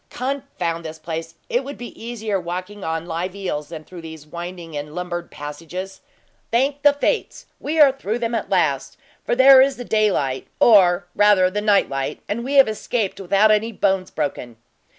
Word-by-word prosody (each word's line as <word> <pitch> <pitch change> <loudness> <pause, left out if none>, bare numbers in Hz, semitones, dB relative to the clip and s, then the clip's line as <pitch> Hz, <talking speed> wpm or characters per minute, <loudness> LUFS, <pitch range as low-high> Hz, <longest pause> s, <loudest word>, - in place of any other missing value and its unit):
Confound 250 -11 -3
this 160 0 -7
place! 165 0 -6
It 245 +3 0
would 280 +2 -7
be 240 - -7
easier 220 -4 -2
walking 185 +4 -6
on 160 0 -3
live 175 +3 -4
eels 150 -7 -4
than 160 -2 -8
through 175 +1 -11
these 160 -2 -10
winding 170 0 -8
and 150 +2 -6
lumbered 175 -1 -4
passages. 165 +6 -7 0.5
Thank 275 +5 +1
the 290 0 +6
fates, - - -2
we 315 +2 -2
are 290 -3 +8
through 235 -4 -3
them, 235 -1 -2
at 230 - -2
last! 155 -8 0 0.3
for - - 0
there 260 +1 +8
is 270 0 +2
the 245 - -7
daylight, 190 - 0
or, 185 -5 +5
rather 200 -3 +4
the 210 +2 -2
nightlight, 195 -10 +1
and 235 +3 -3
we 275 +3 -2
have 275 -3 +7
escaped 215 -1 -2
without 200 +3 +4
any 215 +2 +2
bones 195 -3 0
broken." 130 -6 -4
190 Hz, 175 wpm, -21 LUFS, 165-235 Hz, 0.5 s, are